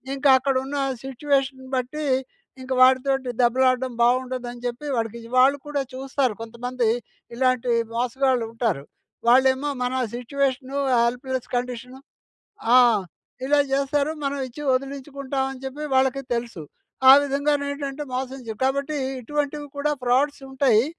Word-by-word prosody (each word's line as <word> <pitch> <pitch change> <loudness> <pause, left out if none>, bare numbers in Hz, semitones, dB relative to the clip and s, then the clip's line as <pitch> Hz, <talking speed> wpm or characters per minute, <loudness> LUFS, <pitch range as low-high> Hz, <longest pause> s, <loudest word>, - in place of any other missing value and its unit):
ఇంకా 275 0 +2
అక్కడున్న 270 +1 -1 0.3
సిట్యుయేషన్ 270 0 -1
బట్టి, 260 +4 -3 0.6
ఇంక 260 0 -9
వాడితోటి 260 0 +4
దెబ్బలాడడం 255 +1 +2
బావుండదని 245 0 0
చెప్పి, 245 +5 -5
వాడికిజి 230 +1 -4
వాళ్ళు 270 +3 +5
కూడా 290 -1 -1
చూస్తారు, 265 -2 -1
కొంతమంది 235 +1 -2 0.5
ఇలాంటి 255 -1 +1 0.2
మోసగాళ్ళు 250 0 +1
ఉంటారు. 225 - -1 0.5
వాళ్ళేమో 265 +3 +4
మన 250 +1 -1 0.2
సిట్యుయేషను 270 +2 -2 0.3
హెల్ప్‌లెస్ 250 +1 -2
కండిషను 250 +1 -4 0.8
ఆ! - - +9 0.7
ఇలా 290 +2 +3
జేస్తారు, 280 +2 +1
మనమిచ్చి 275 0 -3
వదిలించుకుంటామని 270 0 -3
చెప్పి, 285 +3 -5
వాళ్ళకీ 265 +1 +2
తెలుసు. 230 -8 -4 0.5
ఆ - - +12
విధంగానేంటంటే, 285 0 -1
మోసం 260 +1 -4
చే 220 - -3
కాబట్టి 280 +3 0 0.2
ఇటువంటివి 295 +3 -3
కూడా 295 +1 +1
ఫ్రాడ్స్ 270 +4 +1
ఉంటాయి. 255 -4 +3
265 Hz, 110 wpm, -24 LUFS, 250-280 Hz, 0.8 s, ఆ